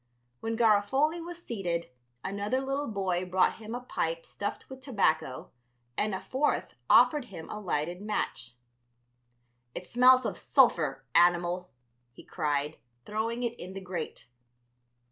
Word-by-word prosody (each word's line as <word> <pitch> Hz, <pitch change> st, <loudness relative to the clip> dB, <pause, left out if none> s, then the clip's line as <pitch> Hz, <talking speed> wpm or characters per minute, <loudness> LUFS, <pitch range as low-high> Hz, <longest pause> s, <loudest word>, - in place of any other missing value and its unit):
When 225 Hz, 0 st, -3 dB
Garofoli 240 Hz, +9 st, +3 dB
was 345 Hz, 0 st, -9 dB
seated 175 Hz, -, -3 dB, 0.3 s
another 200 Hz, +6 st, -1 dB
little 275 Hz, +2 st, -2 dB
boy 190 Hz, -4 st, -1 dB
brought 185 Hz, 0 st, +2 dB
him 225 Hz, +1 st, -6 dB
a 245 Hz, -, -4 dB
pipe -, -, -2 dB
stuffed -, -, -5 dB
with 265 Hz, 0 st, -10 dB
tobacco, 160 Hz, -, 0 dB, 0.4 s
and 210 Hz, +4 st, 0 dB
a -, -, -3 dB
fourth 285 Hz, +3 st, -1 dB, 0.2 s
offered 250 Hz, +2 st, +6 dB
him 180 Hz, -8 st, -9 dB
a 210 Hz, -, -5 dB
lighted 175 Hz, -2 st, -2 dB
match. 125 Hz, -, -3 dB, 1.2 s
"It 180 Hz, -, -5 dB
smells 255 Hz, +3 st, +6 dB
of -, -, -2 dB
sulphur, 155 Hz, -, +3 dB
animal," 175 Hz, +1 st, +3 dB, 0.4 s
he -, -, -13 dB
cried, 150 Hz, -2 st, -1 dB, 0.3 s
throwing 225 Hz, +3 st, -2 dB
it 235 Hz, -1 st, 0 dB
in 185 Hz, +1 st, -7 dB
the 195 Hz, -, -5 dB
grate. 180 Hz, -4 st, -6 dB
205 Hz, 135 wpm, -29 LUFS, 175-250 Hz, 1.2 s, offered